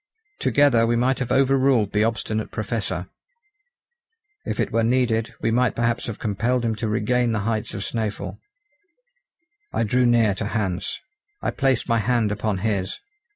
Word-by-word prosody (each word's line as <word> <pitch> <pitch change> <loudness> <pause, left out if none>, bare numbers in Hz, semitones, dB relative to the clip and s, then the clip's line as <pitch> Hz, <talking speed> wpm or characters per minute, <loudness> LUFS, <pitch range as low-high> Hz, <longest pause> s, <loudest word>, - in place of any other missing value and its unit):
Together 130 -6 +4
we 120 - +2
might 125 +3 +1
have 125 -2 -3
over 135 +1 +4
ruled 130 -6 +3
the 105 0 +3
obstinate 110 -1 -1
Professor; 105 -4 -3 1.4
if - - -3
it - - 0
were 115 - +2
needed, 115 -2 +1
we 115 - +1
might 125 +1 +2
perhaps 120 0 0
have 115 - -5
compelled 115 +4 0
him 115 - +1
to 110 +1 -3
regain 120 +2 +1
the 110 - 0
heights 110 -1 -2
of 100 - -4
Snæfell. 110 0 -3 1.3
I - - 0
drew 125 +3 +2
near 115 -3 +4
to 100 - -4
Hans. 100 -5 -2 0.4
I - - 0
placed 135 -3 +1
my 115 -1 +2
hand 115 -1 +1
upon 105 -1 -1
his. 100 -4 -1
115 Hz, 160 wpm, -23 LUFS, 105-125 Hz, 1.4 s, Together